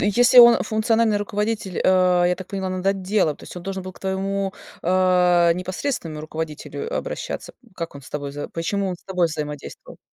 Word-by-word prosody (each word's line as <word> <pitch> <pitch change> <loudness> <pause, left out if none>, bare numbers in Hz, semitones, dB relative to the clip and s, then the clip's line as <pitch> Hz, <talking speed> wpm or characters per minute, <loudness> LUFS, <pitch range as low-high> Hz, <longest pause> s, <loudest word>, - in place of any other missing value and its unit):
если 240 +5 +5
он 235 -1 +9
функциональный 220 0 +1
руководитель, 205 -2 -2
э, 180 -1 +4
я 180 - +2
так 185 - -8
поняла, 190 -1 -3
над 185 +1 -4
отделом, 195 -4 +1
то - - -14
есть - - -11
он 175 - -7
должен 190 0 -4
был 185 0 -7
к - - -18
твоему, 195 0 -2 0.3
а, 180 -1 +4
непосредственному 180 - -4
руководителю 160 - -5
обращаться? - - -4 0.2
Как 165 -2 -5
он 140 - -10
с - - -14
тобой 140 -1 -4
за 145 - -6
почему 195 +4 -2
он 180 - -3
с - - -29
тобой 180 -3 +1
взаимодействовал? 150 -2 -7
185 Hz, 185 wpm, -22 LUFS, 170-205 Hz, 0.3 s, он